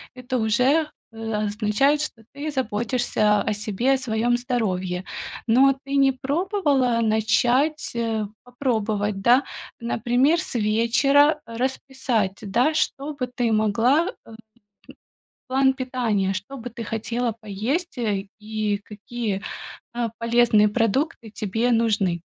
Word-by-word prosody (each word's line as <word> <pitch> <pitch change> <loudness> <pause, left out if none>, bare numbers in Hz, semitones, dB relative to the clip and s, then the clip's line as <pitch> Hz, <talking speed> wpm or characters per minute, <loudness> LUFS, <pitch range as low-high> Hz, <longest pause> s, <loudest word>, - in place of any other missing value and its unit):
это 255 0 -3
уже, 255 +8 +2 0.2
э, 225 0 -6
означает, 210 +7 +1
что 235 -7 -5
ты 290 +2 -4
заботишься 235 -4 +1
о - - 0
себе, 215 +5 0
о - - +2
своём 240 -1 +1
здоровье. 190 -7 -2 0.4
Но 260 +4 +5
ты 280 0 -1
не 270 -1 +5
пробовала 280 - +1
начать, 240 +7 +2
э, 225 -2 -1 0.2
попробовать, 220 -5 -1
да? 245 +6 +5 0.4
Например, 245 +7 +2
с - - -5
вечера 245 +8 +3
расписать, 245 -3 -2
да, 240 +10 +1
что 295 -1 -1
бы 265 -3 -3
ты 245 -1 -1
могла, 225 - +3 0.2
а, - - -14 1.2
план 265 +1 +3
питания, 240 -7 -1
что 200 +9 -6
бы 245 +1 -7
ты 235 -1 -7
хотела 230 +2 -2
поесть, 245 - -3
э, 205 -4 -1
и 215 -1 -2
какие, 210 -1 -4 0.5
а, 235 -1 -1
полезные 230 -2 +4
продукты 230 +2 0
тебе 220 +3 -1
нужны? 215 -7 +1
235 Hz, 120 wpm, -23 LUFS, 215-265 Hz, 1.2 s, Но